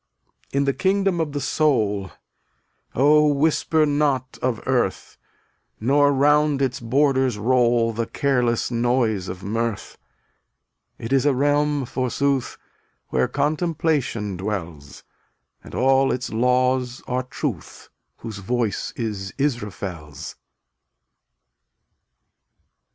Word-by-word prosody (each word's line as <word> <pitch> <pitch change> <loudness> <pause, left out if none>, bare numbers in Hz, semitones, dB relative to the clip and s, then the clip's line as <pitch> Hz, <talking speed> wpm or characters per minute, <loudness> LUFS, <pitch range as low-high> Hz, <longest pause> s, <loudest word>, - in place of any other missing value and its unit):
260 - - -2
In 140 - +3
the 140 - +1
kingdom 195 0 +1
of 145 -3 -3
Soul 110 -10 +1 0.9
Oh, 150 +3 +5
whisper 155 +2 +2
not 145 -3 0
of 125 -3 0
earth, 125 -7 -1 0.6
Nor 145 +5 +3
round 145 +1 +3
its 130 -2 -1
borders 130 0 +1
roll 120 0 +2
The 115 +1 -2
careless 125 -5 0
noise 115 -5 +1
of 90 +1 -7
mirth; 115 +1 -3 1.0
It 115 +4 -4
is 135 +1 +3
a 140 - +3
realm, 145 +1 +1
forsooth, 130 +1 -1 0.5
Where - - +1
Contemplation 150 - -1
dwells, 85 -7 -6 0.6
And - - -10
all 135 +1 +3
its 125 -2 -3
laws 125 +1 +1
are 125 +1 -1
Truth, 130 - -6 0.3
Whose 110 -3 -7
voice 110 +1 -2
is 105 -5 -4
Israfel's. 95 - -4
130 Hz, 100 wpm, -22 LUFS, 115-145 Hz, 1.0 s, Oh